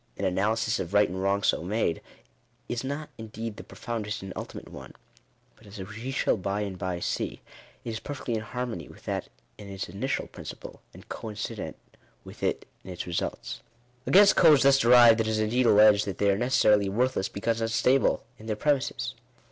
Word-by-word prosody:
An 100 - -2
analysis 110 +5 0
of 90 +3 -4
right 105 0 +5
and 95 +1 -5
wrong 100 +1 +1
so - - +2
made, 90 -2 -1 0.7
is 120 0 -3
not 145 +3 -4
in 110 - -7
deed 110 0 -6
the - - -8
profoundest 105 -3 -5
and 95 -1 -7
ultimate - - -7
one; - - -11 0.6
but, 110 - -19
as 100 - -11
we 105 +6 -7
shall 135 - +1
by 100 +2 -2
and 100 -2 -4
by 90 -1 -3
see, - - -3 0.5
it - - -4
is 110 - -4
perfectly 140 -4 -5
in 110 - -1
harmony 115 -6 -5
with - - -16
that - - -3 0.3
in 100 -1 -10
its 95 0 -5
initial 130 +8 -2
princi - - -9
ple, - - -11
and - - -15
coincident 105 -2 -6 0.5
with - - -13
it - - -1 0.2
in - - -11
its 90 -1 -5
results. 60 -7 -4 0.5
Against 200 +2 +7
codes 155 -7 +6
thus 135 0 +5
derived, 120 -2 +7
it 110 - -1
is 110 0 0
indeed 115 +3 +1
alleged, 105 -1 +6
that 95 - -4
they 100 -1 +3
are - - +2
necessarily 105 -5 +3
worthless 120 -1 0
because 115 +3 -2
unstable 120 +4 +2 0.2
in 110 - -11
their 110 - -1
premises. 145 +3 -1
110 Hz, 190 wpm, -27 LUFS, 100-120 Hz, 0.7 s, Against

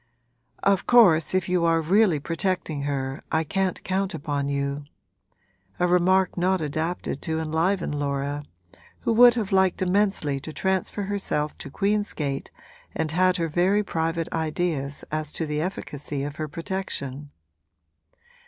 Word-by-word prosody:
'Of 195 -1 +2
course 185 -9 +5
if 185 -1 +1
you 180 -1 +1
are 165 -1 +3
really 180 0 +3
protecting 165 -1 -2
her 135 0 -3
I 160 0 +2
can't 190 +3 -1
count 190 +1 -1
upon 145 -1 -2
you': 140 0 -2 0.9
a 180 - +3
remark 180 +1 +3
not 185 +1 +1
adapted 155 0 -3
to 160 0 -2
enliven 165 +4 0
Laura, 145 0 -2 0.6
who 230 - +1
would 240 +1 +7
have 215 -5 -2
liked 190 -1 +3
immensely 185 -7 +1
to 155 - -8
transfer 190 +4 -1
herself 190 -7 -2
to - - -7
Queen's 205 +6 0
Gate 140 -3 -3 0.5
and 160 -1 -1
had 185 +2 +3
her 165 -1 0
very 185 +6 +2
private 165 -2 -1
ideas 155 -3 -2
as 155 -1 -3
to 165 - -2
the 150 0 -2
efficacy 150 -5 -4
of 145 +1 -5
her 155 - -3
protection. 150 -4 -4
165 Hz, 145 wpm, -25 LUFS, 145-190 Hz, 0.9 s, would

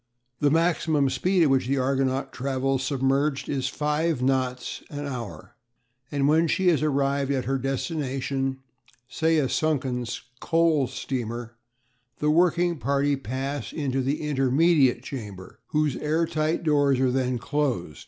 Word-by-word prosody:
The 145 - +3
maximum 160 -3 +2
speed 185 +3 +2
at 145 - +3
which 130 -2 +2
the 140 +1 +1
Argonaut 135 0 0
travels 135 0 -1
submerged 135 +1 0
is 135 -2 -1
five 150 +2 0
knots 130 -1 -1
an 145 0 -5
hour, 125 -7 -7 0.6
and 140 -1 +1
when 160 +3 +4
she 185 +3 +2
has 160 -5 +2
arrived 140 -2 +1
at 135 -3 0
her 135 +2 0
destination 135 -1 -2 0.4
say 160 +6 +1
a 145 -3 +2
sunken 130 -5 0 0.4
coal 165 -5 +2
steamer 120 -3 -4 0.6
the 150 0 +1
working 175 0 +2
party 140 +3 +1
pass 135 -1 -4
into 135 -4 -1
the 140 +4 -1
"intermediate" 135 -2 +3
chamber, 105 -9 -8
whose 150 -3 0
air 155 +2 0
tight 155 +1 -1
doors 145 -4 +3
are 130 -1 +2
then 130 -1 0
closed. 125 - -2
140 Hz, 140 wpm, -25 LUFS, 130-150 Hz, 0.6 s, when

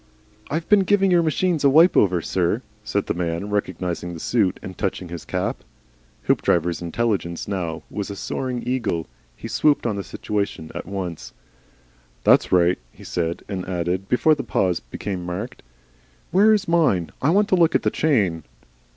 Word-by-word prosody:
"I've 160 +2 -2
been 210 - +6
giving 195 0 +3
your 175 -1 +5
machines 165 0 0
a 140 - +6
wipe 160 +6 +6
over, 90 -5 +3
sir," 95 +7 0 0.2
said 105 -1 -1
the - - -1
man, 85 +3 -3
recognising 90 -3 -2
the - - -8
suit, 100 -1 +1
and 95 - -7
touching 95 -3 -3
his 85 -1 -7
cap. - - -3 0.6
Hoopdriver's 85 0 +1
intelligence 85 -1 -2
now 90 -5 -3
was 105 -1 -5
a 100 - -5
soaring 125 +4 -4
eagle; 110 -11 -1 0.3
he - - -8
swooped 150 -4 +2
on 110 -4 0
the 100 - -3
situation 100 -8 -3
at - - -6
once. 95 -4 -5 0.9
"That's - - +4
right," 90 0 +4
he - - -15
said, 85 -1 -3
and 95 -2 -4
added, 90 +2 -2
before 155 +5 +4
the 140 -2 -3
pause 95 -5 0
became 90 +9 -5
marked, 100 +9 -5 0.7
"Where 205 +5 +5
is 205 -2 +2
mine? 150 - +2
I 140 - +2
want 200 +4 +3
to - - +4
look 170 -2 +3
at - - +2
the - - +1
chain." 100 - +1
100 Hz, 170 wpm, -22 LUFS, 90-145 Hz, 0.9 s, been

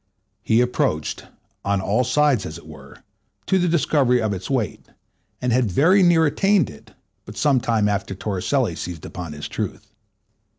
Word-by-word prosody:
He 110 +2 +2
approached, 80 -10 -1 0.4
on 100 0 0
all 100 +6 +1
sides 130 -3 +2
as 80 - -7
it - - -15
were, - - -14 0.4
to 190 - +2
the 180 - +1
discovery 145 -6 +2
of 110 -3 -1
its 95 -1 -6
weight, 125 -8 -2 0.5
and 125 -2 0
had 125 -3 +2
very 165 - +4
near 170 -3 +5
attained 195 - +2
it, 70 - -17 0.3
but 105 0 -11
some 135 +5 +3
time 110 -3 +1
after 100 -1 -2
Torricelli 95 -1 -1
seized 85 -3 -7
upon 85 -4 -7
his 75 0 -6
truth. - - -5
115 Hz, 165 wpm, -22 LUFS, 95-145 Hz, 0.5 s, near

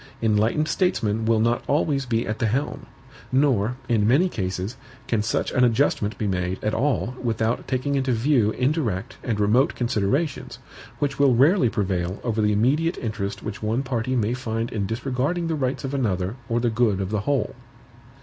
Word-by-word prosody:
Enlightened 110 +7 +2
statesmen 115 - 0
will 115 -1 +3
not 120 +2 +1
always 140 -2 +1
be 115 -1 0
at 110 0 -3
the 115 - +1
helm. 135 +3 -2 0.4
Nor, 125 -4 +2
in 110 -3 +2
many 150 +11 +4
cases, 95 - -3 0.3
can 115 -3 +1
such 105 - -1
an 125 - +2
adjustment 115 -4 +2
be 110 - -2
made 90 -1 -1
at 105 - 0
all 135 -3 0
without 115 -1 -1
taking 130 +2 -1
into 135 -2 +1
view 120 -1 +2
indirect 125 - -1
and 115 -4 -1
remote 110 +7 +3
considerations, 125 +6 -1 0.4
which 140 -1 -2
will 135 -3 +5
rarely 140 - +4
prevail 95 -4 -2
over 115 -2 0
the 105 0 +2
immediate 140 - +2
interest 105 -3 -4
which 105 -1 -6
one 110 +5 0
party 125 -1 -1
may 115 -1 +1
find 115 -2 -3
in 100 -3 -2
disregarding 130 - -1
the 165 - -1
rights 135 -3 -2
of 135 0 -4
another 100 -6 -1
or 115 0 +1
the 120 -1 +1
good 110 -4 +2
of 95 0 -3
the 105 - 0
whole. 140 +6 0
115 Hz, 180 wpm, -24 LUFS, 105-135 Hz, 0.4 s, will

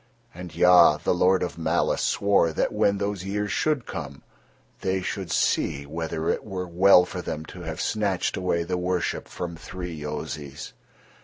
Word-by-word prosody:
And 85 -2 -9
Ya, 85 -3 +6
the 80 - 0
Lord 90 +1 +3
of 85 -1 -5
malice, 80 - +1
swore 100 -5 +2
that - - 0
when 100 0 +2
those 100 -2 -3
years 100 +1 -2
should 150 -6 0
come, 70 - -7 0.6
they 95 0 -1
should 95 -2 -4
see 70 0 +1
whether 80 +1 -4
it - - -3
were 95 -3 -5
well 90 +1 +6
for 90 0 -6
them 80 -2 -5
to 90 - -10
have 80 0 -6
snatched 100 -4 0
away 90 -2 0
the 90 +2 -2
worship 90 -2 -2
from 85 -1 -6
three 90 +1 -7
Yozis. 75 -1 -6
90 Hz, 165 wpm, -25 LUFS, 80-95 Hz, 0.6 s, Ya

